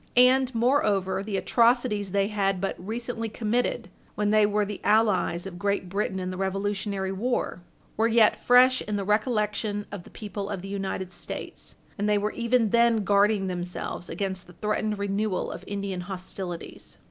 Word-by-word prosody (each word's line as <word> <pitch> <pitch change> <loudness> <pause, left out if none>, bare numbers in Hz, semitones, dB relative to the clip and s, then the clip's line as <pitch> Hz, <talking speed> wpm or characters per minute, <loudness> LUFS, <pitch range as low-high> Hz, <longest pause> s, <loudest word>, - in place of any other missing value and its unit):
And, 255 0 +5
moreover, 210 -7 +2
the 200 -1 -3
atrocities 230 -3 +2
they 200 +1 +1
had 195 -3 0
but 195 +1 -2
recently 225 +3 -4
committed, 230 +3 -1 0.3
when 210 0 +1
they 215 -1 +5
were 210 0 +1
the 205 -1 -6
allies 195 -5 +2
of 180 -2 -7
Great 200 -2 -1
Britain 195 0 -1
in 185 0 -3
the 185 - -6
Revolutionary 195 0 -1
war, 205 -3 -1 0.4
were 225 +1 +3
yet 225 -2 +4
fresh 255 +1 +6
in 210 - -3
the 200 - -1
recollection 210 -1 0
of 200 -3 -6
the - - -14
people 205 -2 -6
of 195 -3 -4
the - - -6
United 195 -2 -3
States, - - -6 0.2
and 205 +1 +1
they 210 - +4
were 210 +1 0
even 235 -2 +1
then 235 -2 +4
guarding 200 0 +3
themselves 180 -1 -4
against 190 +1 -3
the 175 - -14
threatened 210 +1 -1
renewal 200 0 -1
of - - -8
Indian 200 -2 -3
hostilities. 185 -1 -7
205 Hz, 170 wpm, -26 LUFS, 195-220 Hz, 0.4 s, fresh